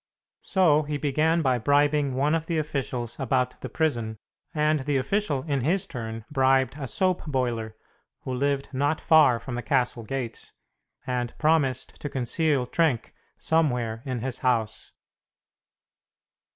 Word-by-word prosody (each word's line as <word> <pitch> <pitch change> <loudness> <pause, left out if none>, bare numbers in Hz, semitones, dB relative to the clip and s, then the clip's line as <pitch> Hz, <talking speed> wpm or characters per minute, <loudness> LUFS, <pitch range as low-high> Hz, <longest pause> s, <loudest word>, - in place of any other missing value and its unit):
So 165 -6 +3
he 150 -1 -3
began 155 +4 +1
by 130 -3 +2
bribing 145 +1 +2
one 145 +4 +2
of 165 0 -1
the 170 - -1
officials 135 -6 -3
about 130 -1 0
the - - -5
prison, 120 -9 -1 0.3
and 150 0 +1
the 140 +1 0
official 145 -1 0
in 140 -4 -1
his 175 +9 +1
turn 115 -3 -6
bribed 135 -2 +3
a 140 -3 -5
soapboiler, 125 - -1 0.5
who 130 - -4
lived 140 +1 0
not 145 +4 +1
far 150 -7 +5
from 125 +3 -7
the 120 - -2
castle 125 -3 0
gates, 120 0 -5 0.5
and 125 -2 -3
promised 150 -5 +1
to 145 - -3
conceal 135 +2 0
Trenck 145 -3 0 0.2
somewhere 125 -8 0
in 130 -3 -3
his 130 0 -3
house. 115 -4 -1
135 Hz, 140 wpm, -26 LUFS, 125-150 Hz, 0.5 s, far